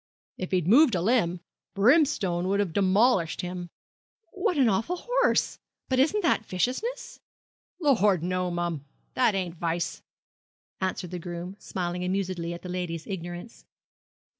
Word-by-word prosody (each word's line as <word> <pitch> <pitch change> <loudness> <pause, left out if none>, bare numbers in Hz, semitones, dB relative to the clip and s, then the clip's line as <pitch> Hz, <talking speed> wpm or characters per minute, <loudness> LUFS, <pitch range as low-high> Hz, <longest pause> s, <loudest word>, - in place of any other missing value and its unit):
If 185 - -5
he'd 180 -3 0
moved 245 +2 +6
a 175 - 0
limb, 185 -6 +1 0.3
Brimstone 200 - +3
'ud 200 +1 +1
have 195 -5 0
'molished 195 -2 +3
him.' 180 -1 -5 0.6
'What 370 -8 -1
an 265 -3 +5
awful 225 - +1
horse! - - +2 0.3
But 260 -1 +2
isn't 370 +10 +2
that 335 - +2
viciousness?' 460 - -3 0.6
'Lor', 210 - +4
no 180 +2 -1
mum. 175 -4 -2 0.3
That 235 -5 +3
ain't 180 -3 -3
vice,' 170 0 -2 0.8
answered 185 -2 -3
the 180 - -4
groom 175 +2 -6
smiling 180 -1 -3
amusedly 185 -2 -2
at 170 - -7
the - - -6
lady's 175 -3 -4
ignorance. 175 +3 -7
185 Hz, 140 wpm, -27 LUFS, 175-240 Hz, 0.8 s, moved